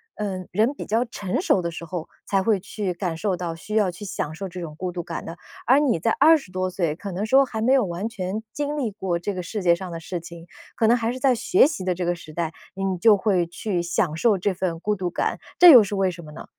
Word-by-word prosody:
嗯， 190 -3 -4
人 220 +8 +2
比 - - -7
较 225 +3 +1
成 200 -5 -3
熟 - - +3
的 170 0 -3
时 170 - -7
候， 165 -1 -5 0.2
才 195 -1 +2
会 210 -3 +2
去 195 -1 -4
感 170 -2 -3
受 195 0 -1
到 170 -2 -4
需 210 +6 -9
要 210 -4 +3
去 195 +4 -8
享 155 -4 -4
受 195 +3 -5
这 180 0 -8
种 155 -3 -7
孤 185 -1 -3
独 175 0 -4
感 165 -1 -6
的。 165 +1 -7 0.3
而 260 +3 +5
你 280 - +2
在 225 +7 +1
20 295 - +4
多 185 0 -1
岁， 170 -4 -1
可 195 +2 -7
能 195 +4 -2
说 265 +5 +5
还 220 -3 -5
没 255 +4 +3
有 265 -4 +4
完 180 +4 -3
全 205 0 -4
经 295 0 -3
历 245 -6 -1
过 190 -3 -2
这 200 +4 -3
个 185 - -4
世 195 +3 -5
界 170 -1 +5
上 180 +1 -7
的 165 - -5
事 175 +2 -5
情， 170 0 -11 0.3
可 225 - +1
能 235 +2 +5
还 230 0 -1
是 255 - -6
在 260 0 +3
学 270 - +4
习 300 - -2
的 180 -1 0
这 180 0 -3
个 175 - +1
时 165 -2 -11
代， 165 0 -3 0.2
你 195 -1 -2
就 210 +1 +6
会 190 -4 +1
去 175 +1 -3
享 170 -2 -1
受 210 +3 +3
这 190 +2 0
份 175 -2 -3
孤 210 +4 -1
独 180 -2 -3
感， - - -2 0.2
这 355 -2 +10
又 240 -6 +9
是 205 +1 -4
为 190 -1 +1
什 170 -1 -10
么 150 - -11
呢？ - - -10
190 Hz, 290 characters per minute, -23 LUFS, 175-220 Hz, 0.3 s, 这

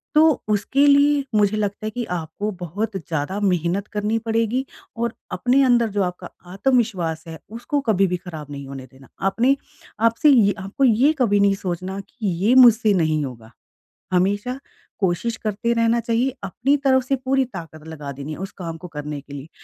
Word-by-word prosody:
तो 305 - +7 0.3
उसके 215 +7 +2
लिए 285 0 +4
मुझे 210 0 +3
लगता 205 0 -2
है - - -1
कि 245 +3 -3
आपको 165 +5 -4
बहुत 200 +5 -4
ज़्यादा 165 +2 -3
मेहनत 185 +1 0
करनी 210 +2 0
पड़ेगी 230 +3 0 0.3
और 235 -1 -1 0.2
अपने 260 +3 +2
अंदर 240 -3 +3
जो 200 - +2
आपका 180 -1 -5 0.2
आत्मविश्वास 190 -8 0
है 160 -1 -8 0.2
उसको 285 +5 -1
कभी 195 -2 +3
भी 180 0 -1
खराब 170 -5 -9
नहीं 140 -1 -7
होने 135 -1 -8
देना। 135 0 -17 0.2
आपने 245 +7 +3 0.5
आपसे 230 +6 +3
ये 220 -8 +5
आपको 195 +8 -3
ये 255 +4 +5
कभी 205 -5 +3
नहीं 200 0 +4
सोचना 185 +1 -4
कि 225 -5 -5 0.2
ये 225 +5 +4
मुझसे 235 -4 +7
नहीं 155 -4 +1
होगा, 115 -4 -10 0.6
हमेशा 205 +8 0 0.4
कोशिश 195 +5 0
करते 220 +2 -2
रहना 230 0 +2
चाहिए 235 +3 0
अपनी 250 +9 +1
तरफ 260 -1 +4
से 270 +2 0
पूरी 265 0 +2
ताकत 165 -9 -10
लगा 150 -3 -7
देनी 140 +3 -7
है - - -7
उस 195 +2 -5
काम 165 -3 -5
को 180 - -9
करने 150 -2 -6
के 140 0 -15
लिए, 140 +2 -8
205 Hz, 180 wpm, -22 LUFS, 170-235 Hz, 0.6 s, तो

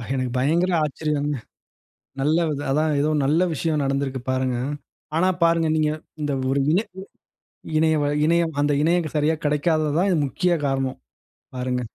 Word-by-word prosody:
எனக்கு 130 -2 -2
பயங்கர 170 +7 +2
ஆச்சரியங்க. 150 0 -2 0.9
நல்ல 155 +4 +2
வித 145 -2 -2
அதுதான் 155 +2 +1
ஏதோ 150 +2 +1
நல்ல 155 +6 +3
விஷயம் 155 0 -1
நடந்திருக்கு 135 -1 -1
பாருங்க. 130 -1 0 0.6
ஆனா 185 +3 +3 0.2
பாருங்க 165 -1 +3
நீங்க 155 -1 +2 0.3
இந்த 145 -1 -1 0.2
ஒரு 140 +1 +1
இணை 195 +7 +2 0.9
இணைய 160 0 +3 0.3
இணையம் 165 -1 +1
அந்த 145 0 +2
இணையம் 170 -1 +1
சரியா 150 +2 +2
கிடைக்காதது 155 +1 +1
தான் 180 -4 +2
முக்கிய 175 +6 0
காரணம். 135 -1 -1 0.6
பாருங்க. 125 0 -1
150 Hz, 135 wpm, -23 LUFS, 140-165 Hz, 0.9 s, நல்ல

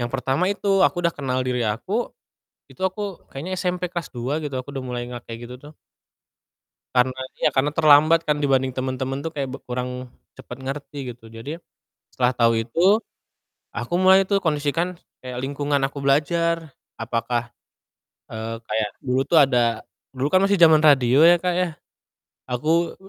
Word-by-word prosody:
yang 120 - -1
pertama 135 +7 0
itu, 200 -1 +1
aku 175 -1 +2
udah 170 - +3
kenal 130 -3 -2
diri 125 -1 -1
aku, 185 - -2 0.6
itu - - -20
aku 190 0 -3
kayaknya 180 +7 -5
SMP 180 -1 -2
kelas 175 -5 -4
2 130 +6 -2
gitu 145 -3 -4
aku 140 +2 -9
udah 135 - -4
mulai 125 -1 -4
nggak 120 -1 -8
kayak 115 +1 -8
gitu 125 - -8
tuh. 150 +3 -13 1.2
Karena 130 +1 +2 0.2
iya, - - +2
karena 135 +2 +2
terlambat 155 +2 +5
kan 150 -1 0
dibanding 135 -2 +1
temen-temen 130 +1 -3
tuh 165 - -3
kayak 140 -4 -4
b - - -3
kurang 125 0 -5 0.2
cepat 125 - -10
ngerti 135 -1 -6
gitu. 115 -1 -17
Jadi, 130 +9 -8 0.5
setelah 125 0 +1
tahu 115 -1 +3
itu, 120 +8 -2 0.9
aku - - -5
mulai 190 +1 +5
tuh 200 -1 +1
kondisikan 165 +3 -1 0.2
kayak 125 -1 -6
lingkungan 145 +2 -1
aku 140 0 -8
belajar 160 +2 +1 0.2
apakah, 115 +1 -2 0.9
eee, 110 +1 -4
kayak 110 -1 -1
dulu 130 0 +1
tuh 170 - +3
ada 120 -4 +1 0.3
dulu 130 +3 0
kan 185 - +5
masih 200 +1 +3
zaman 160 -3 +6
radio 135 -3 +5
ya 170 +2 +8
Kak 180 +1 -1
ya, 180 0 +1 0.8
aku, 160 +7 0
140 Hz, 165 wpm, -23 LUFS, 125-165 Hz, 1.2 s, ya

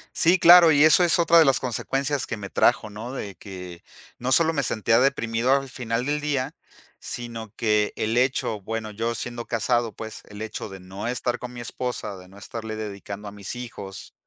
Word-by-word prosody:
Sí, 175 +3 +4
claro. 170 -1 +9
Y 145 +1 +5
eso 155 +3 +6
es 170 0 +3
otra 170 0 +6
de 160 - +7
las 135 -3 +3
consecuencias 135 +3 -1
que 115 - -3
me 100 -2 -7
trajo, 110 - +2
¿no?, 110 +5 -7
de 100 -7 -6
que 90 -3 -9 0.4
no 125 +2 +1
solo 165 +2 +5
me 150 -3 0
sentía 115 0 +2
deprimido 125 -2 +1
al 135 -1 0
final 120 -1 -3
del 145 +1 0
día, 145 -1 -2 0.5
sino 115 -3 -6
que 105 -2 +1
el 110 +2 -1
hecho 125 -4 +1
bueno, 110 +2 -4
yo 115 +3 -2
siendo 120 +2 -5
casado, 115 0 0
pues, 110 -1 -8
el 105 0 -10
hecho 110 0 -5
de 95 -2 -10
no 95 +4 -6
estar 125 0 -1
con 125 0 -7
mi 120 - -7
esposa, 120 -4 -4
de 90 0 -13
no 95 +2 -16
estarle 110 +1 -6
dedicando 105 -1 -7
a - - -11
mis 100 +2 -7
hijos, 115 -6 -8
115 Hz, 200 wpm, -24 LUFS, 105-130 Hz, 0.5 s, claro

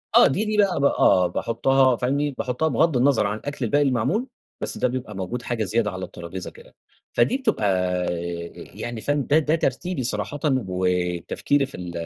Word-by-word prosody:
آه، - - +8
دي 195 +10 0
دي 215 0 -1
بقى 200 -6 +3
ب 140 - +2
آه 95 -9 +4
باحُطّها 130 +7 +2
فاهمني، 140 +5 0
باحُطّها 125 +5 -1
بغض 155 +1 +2
النظر 125 -4 +3
عن 105 +1 -2
الأكل 140 +1 -4
الباقي 145 +6 +2
المعمول، 140 - 0 0.3
بس - - -3
ده - - +2
بيبقى 125 -4 -5
موجود 95 +6 -4
حاجة 115 -1 -2
زيادة 105 +1 0
على 95 0 -5
الترابيزة 85 +1 -8
كده، - - -17 0.4
فدي 120 - +2
بتبقى 220 - 0 1.1
يعني 120 -2 -5
فاهم، 145 +3 0
ده 150 +2 +5
ده 155 +1 +1
ترتيبي 160 0 -2
صراحةً 105 +4 -2 0.3
وتفكيري 90 - 0
في 135 - -10
ال 90 -1 -6
125 Hz, 175 wpm, -23 LUFS, 105-145 Hz, 1.1 s, آه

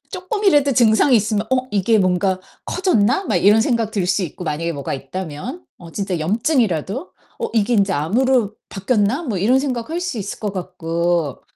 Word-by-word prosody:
쪼끔이라도 365 -7 +1
증상이 235 +2 +4
있으면 215 0 0
'어 255 0 +1
이게 210 +2 +2
뭔가 185 0 +1 0.2
커졌나?' 355 - +1
막 - - +1
이런 210 +3 +5
생각 230 -3 0
들 200 -5 -1
수 190 +2 +1
있고 180 +1 -6
만약에 165 +2 -2
뭐가 140 -3 -4
있다면 170 - -6
어 165 -2 -12
진짜 195 -3 -2
염증이라도 220 - 0 0.3
'어 465 - -2
이게 230 +2 +2
인제 200 -2 +2
암으로 215 - +1 0.2
바뀌었나?' 210 - 0
뭐 225 -8 -2
이런 240 +8 +3
생각할 270 +4 -3
수 360 -8 -3
있을 200 -1 -6
것 205 -2 -3
같고 170 -4 -2
210 Hz, 355 characters per minute, -20 LUFS, 180-255 Hz, 0.3 s, 이런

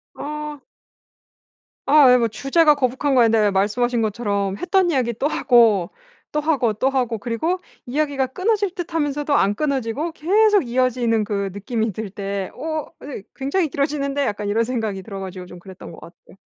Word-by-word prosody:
어. 300 0 -6 1.3
아 300 -3 +6
네 250 0 +7
뭐 235 -2 +2
주제가 295 +7 +3
거북한 265 +1 0
거 250 - +6
아닌데 225 -1 +4
그냥 205 -2 +2
말씀하신 230 +5 +1
것처럼 200 -3 -1
했던 360 - +2
이야기 250 -5 0
또 265 +6 -1
하고, 230 - +3 0.4
또 300 - 0
하고, 280 -8 +1
또 255 +6 0
하고 250 -4 -1
그리고 245 - -2 0.3
이야기가 280 0 0
끊어질 405 - 0
듯하면서도 295 -5 -2
안 205 -6 +3
끊어지고 280 +3 -2
계속 405 - +3
이어지는 240 -2 +1
그 200 -2 -2
느낌이 220 +2 -2
들 215 +2 -5
때 195 -1 -4
'어? 310 +2 -4
아니 270 -8 -8
굉장히 285 +6 0
길어지는데?' 280 0 -1
약간 210 -4 -2
이런 220 +3 +1
생각이 225 -5 -3
들어 195 0 -7
가지고 185 -1 -7
좀 180 - -11
그랬던 185 0 -11
것 165 - -12
같아요. 170 - -16
250 Hz, 365 characters per minute, -21 LUFS, 210-295 Hz, 1.3 s, 네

